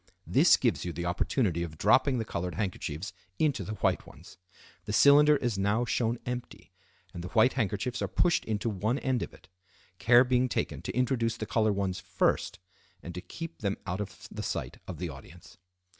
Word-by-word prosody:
This - - +5
gives - - 0
you 90 - -3
the 85 +1 -5
opportunity 90 - 0
of 80 -3 -5
dropping 130 - +4
the 115 - -2
colored 90 -3 -4
handkerchiefs 95 -3 -4 0.2
into 145 -10 +1
the 100 +4 -5
white - - +1
ones. - - -15 0.5
The 105 - -4
cylinder 145 +5 +7
is 120 -7 -1
now 105 +5 +1
shown 115 0 0
empty, 125 0 -6 0.4
and 85 - -6
the - - -5
white 115 +5 +4
handkerchiefs 120 +1 -2
are - - 0
pushed 175 -2 +2
into 110 0 -2
one 110 +4 0
end 130 -3 -1
of - - -4
it; 95 - -18 0.5
care 120 +1 +6
being 125 0 +1
taken 75 -9 -2
to 95 - -5
introduce 120 -3 +1
the 110 - -4
colored 110 -1 +1
ones 95 -2 -2
first, - - 0 0.5
and 85 - -7
to 90 - -6
keep 165 - -8
them 100 -2 -1
out 90 +2 -3
of 105 - -8
sight - - -4
of - - -6
the - - -4
audience. 90 +2 -13
110 Hz, 190 wpm, -29 LUFS, 95-125 Hz, 0.5 s, cylinder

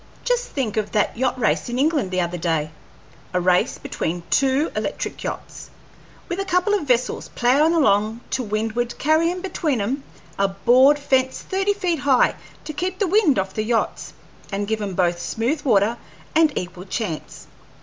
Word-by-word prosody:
Just - - +1
think 230 -7 -3
of 210 -1 -1
that 210 - +1
yacht 260 +2 0
race 240 +2 +1
in 240 - -2
England 285 - +1
the 185 0 0
other 175 0 -3
day 160 -2 -1 0.6
a - - +3
race 180 0 +2
between 170 +1 -4
two 275 +3 +2
electric - - -3
yachts, - - -6 0.6
with 350 +2 -3
a - - 0
couple 370 +2 +1
of 385 -8 0
vessels 250 -1 0
ploughin' 280 +7 +3
along 220 -6 +2
to - - 0
windward 225 +2 -2
carryin' 330 +4 +2
between 335 - -1
'em 250 +8 -1 0.4
a 200 - +4
board 250 +8 +4
fence 265 -2 0
thirty 390 +2 0
feet 360 -5 -1
high 270 -3 +3 0.3
to 305 - -5
keep 370 +4 -3
the 400 - +1
wind 375 -6 +3
off 190 0 -1
the 215 - -1
yachts 225 +1 -1 0.4
and 200 +1 -2
give 220 0 -1
'em 195 -3 -3
both 175 -1 +1
smooth 235 - -1
water 225 -2 +2 0.3
and 315 -1 +4
equal 180 0 -5
chance. 190 -5 -5
245 Hz, 170 wpm, -22 LUFS, 200-310 Hz, 0.6 s, a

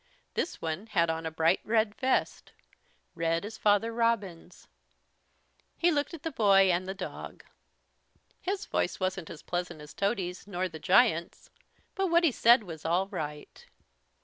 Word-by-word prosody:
This - - -2
one 165 +6 -4
had 170 -6 +2
on 160 0 -4
a - - -1
bright 160 +3 +2
red 220 -1 +1
vest, 260 +4 -1 0.6
red 165 +1 -1
as 220 +1 -8
Father 210 +2 +2
Robin's. 225 -7 -2 1.1
He 345 - +3
looked 295 +2 -1
at 315 - -13
the 325 - -2
boy 195 -5 +5
and 180 +1 -1
the 190 - -4
dog. - - -8 1.0
His 390 +1 -3
voice - - -1
wasn't 185 -3 -2
as 150 - -10
pleasant 175 -2 -4
as 150 0 -11
Tody's 195 -3 -2
nor 185 -2 -2
the 160 -3 -10
giant's, 180 -1 +2 0.4
but 385 -1 0
what 340 0 +3
he 325 - +4
said 235 0 +5
was 165 -5 -9
all 180 +4 +1
right. 150 -6 -7
195 Hz, 155 wpm, -29 LUFS, 170-230 Hz, 1.1 s, boy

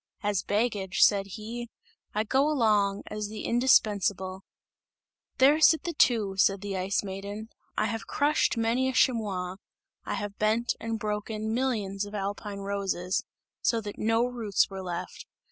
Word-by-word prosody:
"As 205 -2 +1
baggage," 205 -3 +1
said 200 -2 +4
he, 235 +2 -6 0.5
"I 215 - +2
go 265 +6 +2
along, 210 -8 +2
as 210 0 -4
the 215 +1 -7
indispensable!" 205 -6 +2 1.0
"There 285 +4 +5
sit 320 0 +6
the 340 - -3
two," 215 -9 +2
said 195 0 +3
the 200 -1 -4
Ice 190 +2 0
Maiden, 200 +3 -6 0.3
"I - - +2
have 225 -1 -3
crushed 290 -3 +1
many 235 +3 +1
a - - -3
chamois; 195 -8 +1 0.5
I - - -3
have 205 0 -5
bent 220 +3 +2
and 225 0 -3
broken 215 +1 -3
millions 215 -6 -1
of 205 - -8
alpine 200 0 -4
roses, 195 -2 -1 0.4
so 230 - +2
that 205 -1 -7
no 225 +2 +2
roots 230 -6 0
were 190 0 -5
left! 175 -2 -6
210 Hz, 150 wpm, -28 LUFS, 195-230 Hz, 1.0 s, sit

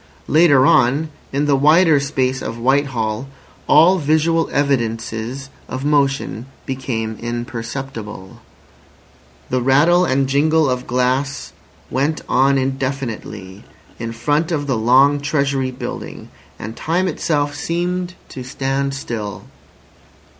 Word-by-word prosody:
Later 145 -4 +5
on, 145 +5 +3 0.2
in 140 +2 0
the 145 -1 +3
wider 155 +2 +5
space 130 -2 -1
of 115 - -5
Whitehall, 125 -2 0 0.4
all 175 +5 +6
visual 160 +2 +1
evidences 120 -1 -2 0.2
of 130 +2 -4
motion 140 -4 0 0.2
became 115 -5 -3
imperceptible. 120 -3 -6 1.1
The 130 0 +1
rattle 150 +8 +4
and 135 -4 +1
jingle 155 +3 +3
of 125 -1 -2
glass 130 +2 -1 0.4
went 145 +4 0
on 135 +2 +3
indefinitely 130 -7 -4 0.4
in 115 -1 -4
front 145 +8 0
of 145 -3 -1
the 135 -3 0
long 130 +6 +4
Treasury 140 -2 0
building—and 120 -3 -8
time 175 +4 0
itself 145 -3 -1
seemed 175 +3 -2
to 130 - -7
stand 135 +2 -2
still. 110 -6 -5
135 Hz, 110 wpm, -19 LUFS, 125-145 Hz, 1.1 s, all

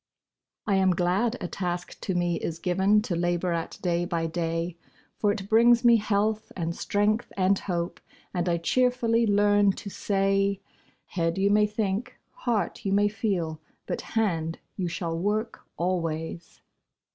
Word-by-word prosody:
I 200 -3 +2
am 190 -2 +3
glad 190 +8 +1
a 175 - -2
task 180 -1 -4
to 190 - -2
me 175 -1 +1
is 165 - -3
given 190 +4 +2
To 180 - -2
labor 175 +1 0
at 165 -1 -4
day 175 -1 +1
by 170 -2 -1
day; 165 +1 -2 0.4
For 205 - +3
it 195 -1 -4
brings 235 +2 +5
me 235 -1 +7
health, 215 0 0
and 170 -1 -2
strength, 210 +3 0
and 190 +1 +3
hope, 175 -2 -3 0.3
And 175 -1 0
I 170 - +2
cheerfully 235 +3 +2
learn 205 -1 +4
to 200 +1 -8
say 195 0 +1 0.5
'Head, 165 -1 -1
you 200 +1 +3
may 210 0 +4
think; 210 +3 -2 0.2
heart, 225 -7 -2
you 195 - -1
may 205 +1 +4
feel; 180 -8 -2 0.2
But - - -3
hand, 170 -8 -1 0.2
you 185 -3 -2
shall 170 -1 -3
work 210 +5 -2
always!' 170 -1 -3
195 Hz, 155 wpm, -27 LUFS, 175-210 Hz, 0.5 s, me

